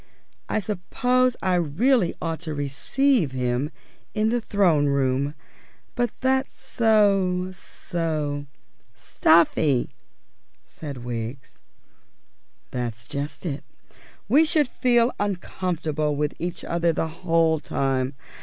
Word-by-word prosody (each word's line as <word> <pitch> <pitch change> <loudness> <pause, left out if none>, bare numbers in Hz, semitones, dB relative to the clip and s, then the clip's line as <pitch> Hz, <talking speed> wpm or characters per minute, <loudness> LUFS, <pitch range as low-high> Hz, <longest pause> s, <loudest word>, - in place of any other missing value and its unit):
I - - +1
suppose 245 +6 +1
really 185 - +2
I - - -7
ought 165 -1 -2
to 155 -2 -5
receive 150 - +1
him 125 +2 -1 0.5
in 215 0 +2
the 240 +1 +1
Throne 175 -9 +3
Room, 140 +1 +1 0.6
but 245 -1 0
that's 265 +1 0
so 195 -5 +2
so 155 -6 -4 0.2
" - - -40
"Stuffy," 155 -5 +3 0.7
said 140 -6 -8
Wiggs. 120 +2 -6 1.1
"That's 120 -1 -4
just 140 +6 -5
it. 145 -4 -3 0.6
We 300 +3 +6
should 310 -3 +2
feel 240 -1 +2
uncomfortable 170 -6 -1
with 150 0 -1
each 175 0 -4
other 170 0 +1
the 160 0 -1
whole 165 -2 +3
time. 135 -1 -1
165 Hz, 105 wpm, -24 LUFS, 140-210 Hz, 1.1 s, We